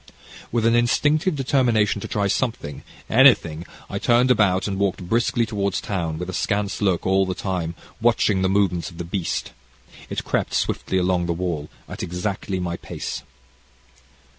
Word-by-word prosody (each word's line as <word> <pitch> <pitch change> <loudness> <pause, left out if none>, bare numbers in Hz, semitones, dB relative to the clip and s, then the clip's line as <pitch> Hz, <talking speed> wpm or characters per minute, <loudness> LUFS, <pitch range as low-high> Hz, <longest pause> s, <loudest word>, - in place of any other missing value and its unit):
"With 115 -1 +1
an 115 - +4
instinctive 150 +8 +2
determination 120 -7 +2
to - - -5
try 100 -1 -1
something 100 - -2 0.3
anything, 100 - +4 0.2
I - - -4
turned 120 +2 +4
about 100 -5 +3
and 100 -1 -3
walked 95 -2 -1
briskly 115 +2 +1
towards 100 -3 -1
town 85 -6 -3
with 90 +2 -4
askance 100 +3 -1
look, 95 -4 +1
all 95 0 +3
the 95 - -2
time, 90 -4 -3 0.3
watching 110 -4 +3
the 95 - +2
movements 95 -3 +1
of 85 - -14
the 85 - -4
beast. 85 0 -3 0.6
It - - -3
crept - - -1
swiftly 95 - 0
along 90 -1 +1
the 85 - +1
wall, 85 -4 -3 0.2
at - - -7
exactly 95 +2 -3
my 85 -1 -3
pace. - - -5
95 Hz, 160 wpm, -23 LUFS, 90-115 Hz, 0.6 s, an